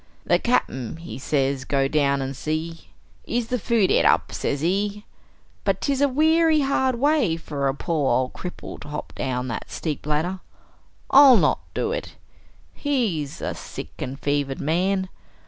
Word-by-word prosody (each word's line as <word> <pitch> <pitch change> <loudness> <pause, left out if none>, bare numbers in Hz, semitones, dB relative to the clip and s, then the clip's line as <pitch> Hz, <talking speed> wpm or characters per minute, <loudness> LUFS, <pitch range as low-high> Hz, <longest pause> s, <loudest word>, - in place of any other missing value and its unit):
"The - - +3
Cap'n, 130 - -1
he 165 -8 -8
say 140 0 +1
go 135 -1 +2
down 140 -2 +1
an' 135 +1 -4
see, 155 +4 -4 0.4
is 235 -1 -2
the 250 - 0
food 220 -3 +2
et - - +4
up, - - +3
sez 140 0 -2
he. 200 +5 -1 0.6
But - - +1
'tis 280 -1 0
a 285 - +4
weary 315 +2 +4
hard 265 -2 +1
way 260 - +2
for 145 -4 -3
a 135 - 0
pore 150 -3 0
ol' 130 0 -1
cripple 180 - -8
to - - -11
hop 150 0 -6
down 125 -1 -2
thet 115 - -5
steep 150 -2 -4
ladder. 160 +5 0 0.7
I'll 270 -3 +9
not - - +2 0.2
do 445 - 0
it. - - -5 0.6
He's 200 - -1
a - - -2
sick 80 - -8
and 135 +2 -5
fevered 145 -2 -1
man. 185 +5 0
165 Hz, 165 wpm, -24 LUFS, -, 0.7 s, I'll